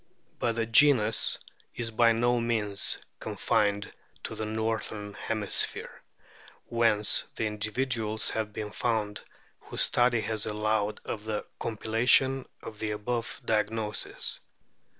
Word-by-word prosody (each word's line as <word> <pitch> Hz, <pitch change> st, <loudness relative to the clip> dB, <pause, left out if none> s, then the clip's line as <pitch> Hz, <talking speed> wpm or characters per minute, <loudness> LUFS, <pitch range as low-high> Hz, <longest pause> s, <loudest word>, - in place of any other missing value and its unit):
But 120 Hz, -2 st, +1 dB
the 115 Hz, -1 st, 0 dB
genus 115 Hz, -2 st, +4 dB, 0.4 s
is 115 Hz, -2 st, -3 dB
by 115 Hz, +1 st, +4 dB
no 120 Hz, +2 st, +2 dB
means 110 Hz, -4 st, +1 dB, 0.2 s
confined 100 Hz, -1 st, 0 dB, 0.3 s
to -, -, -5 dB
the 110 Hz, -, -4 dB
northern 110 Hz, -1 st, -3 dB
hemisphere, 105 Hz, 0 st, 0 dB, 0.6 s
whence 115 Hz, -3 st, +3 dB
the 110 Hz, -, -1 dB
individuals 110 Hz, +1 st, -1 dB
have 110 Hz, -1 st, -2 dB
been 105 Hz, 0 st, -5 dB
found 110 Hz, -3 st, -1 dB, 0.4 s
whose -, -, +1 dB
study 120 Hz, -2 st, +3 dB
has 110 Hz, 0 st, -2 dB
allowed 105 Hz, 0 st, -1 dB
of 105 Hz, -2 st, -5 dB
the 110 Hz, -1 st, -3 dB
compilation 120 Hz, +4 st, +2 dB, 0.2 s
of 110 Hz, -2 st, -9 dB
the 110 Hz, -, -2 dB
above 115 Hz, +3 st, -3 dB
diagnoses. 105 Hz, 0 st, 0 dB
110 Hz, 115 wpm, -28 LUFS, 105-115 Hz, 0.6 s, genus